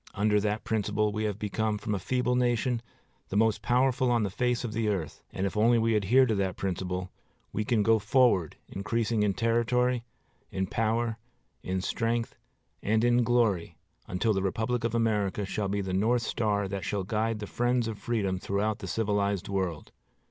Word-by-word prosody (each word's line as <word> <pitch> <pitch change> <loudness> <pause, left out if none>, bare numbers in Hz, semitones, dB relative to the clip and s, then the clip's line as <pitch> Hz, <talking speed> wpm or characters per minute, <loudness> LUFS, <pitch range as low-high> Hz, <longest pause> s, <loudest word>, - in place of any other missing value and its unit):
Under 105 +1 +3
that 105 +1 -1
principle 105 -1 0
we 110 +1 -2
have 105 -2 -2
become, 105 +1 -1
from 105 +1 -3
a 100 - -1
feeble 125 +4 0
nation, 120 -1 +1 0.5
the 100 - -1
most 110 -1 +2
powerful 125 +3 +2
on 120 -2 +2
the 100 - -2
face 125 +3 0
of 115 -3 -4
the 110 -1 0
earth; 90 -8 -3
and, 95 - -2
if 100 - -3
we 105 - +2
only 115 0 +4
adhere 115 +6 +4
to 115 - +1
that 95 -3 -1
principle, 90 -1 -3 0.4
we 110 - 0
can 110 -1 +2
go 115 +1 +4
forward 105 - +3
increasing 110 +3 -1
in 100 -2 +1
territory, 120 +1 +1 0.5
in 95 0 -1
power, 115 +3 -1 0.4
in 95 0 -2
strength, 115 +4 -1 0.5
and 110 +2 +1
in 120 0 +4
glory 105 -8 +1 0.3
until 105 +5 +1
the 95 - 0
Republic 110 +5 -1
of 115 0 -1
America 105 -3 +1
shall 100 +1 -2
be 100 +1 -1
the 95 -1 -3
north 115 +5 +2
star 105 -3 0
that 100 -1 -4
shall 100 +1 -2
guide 110 +3 -1
the 105 - -5
friends 120 +2 0
of 110 -2 -5
freedom 100 -6 -1
throughout 100 +3 -1
the 95 - -6
civilized 100 -1 0
world. 95 -6 -2
110 Hz, 185 wpm, -28 LUFS, 100-115 Hz, 0.5 s, only